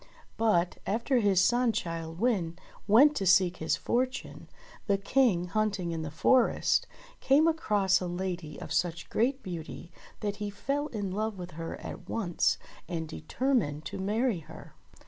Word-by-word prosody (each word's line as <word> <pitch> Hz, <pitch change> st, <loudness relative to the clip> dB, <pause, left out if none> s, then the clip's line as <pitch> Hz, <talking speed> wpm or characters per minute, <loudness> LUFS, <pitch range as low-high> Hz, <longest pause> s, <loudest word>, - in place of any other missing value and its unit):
But, 185 Hz, -6 st, +1 dB
after 235 Hz, +5 st, +1 dB
his 200 Hz, -4 st, +3 dB
son 240 Hz, +1 st, +3 dB
Childe 165 Hz, -2 st, -4 dB
Wynde 190 Hz, -8 st, 0 dB, 0.3 s
went 275 Hz, +8 st, +6 dB
to 195 Hz, -, -1 dB
seek 180 Hz, -1 st, +4 dB
his 160 Hz, -, 0 dB
fortune, 255 Hz, +2 st, -2 dB, 0.4 s
the 200 Hz, -1 st, +3 dB
King, 200 Hz, -3 st, +2 dB
hunting 200 Hz, -4 st, -1 dB
in 165 Hz, -1 st, -3 dB
the 155 Hz, -, -4 dB
forest, 245 Hz, -, +3 dB, 0.3 s
came 290 Hz, +4 st, +4 dB
across 205 Hz, -, +2 dB
a 180 Hz, -, -2 dB
lady 175 Hz, -3 st, -4 dB
of -, -, -6 dB
such 170 Hz, -1 st, -1 dB
great 260 Hz, +5 st, +1 dB
beauty 170 Hz, -1 st, -7 dB, 0.3 s
that 205 Hz, -1 st, -2 dB
he 210 Hz, -1 st, -3 dB
fell 275 Hz, +8 st, -2 dB
in 205 Hz, -8 st, -4 dB
love 215 Hz, +1 st, -2 dB
with 180 Hz, 0 st, -7 dB
her 165 Hz, +1 st, -6 dB
at -, -, -9 dB
once 185 Hz, -7 st, +1 dB, 0.3 s
and 165 Hz, -2 st, -3 dB
determined 155 Hz, -, -1 dB
to -, -, -5 dB
marry 215 Hz, +1 st, 0 dB
her. 160 Hz, +1 st, -13 dB
195 Hz, 155 wpm, -29 LUFS, 170-235 Hz, 0.4 s, went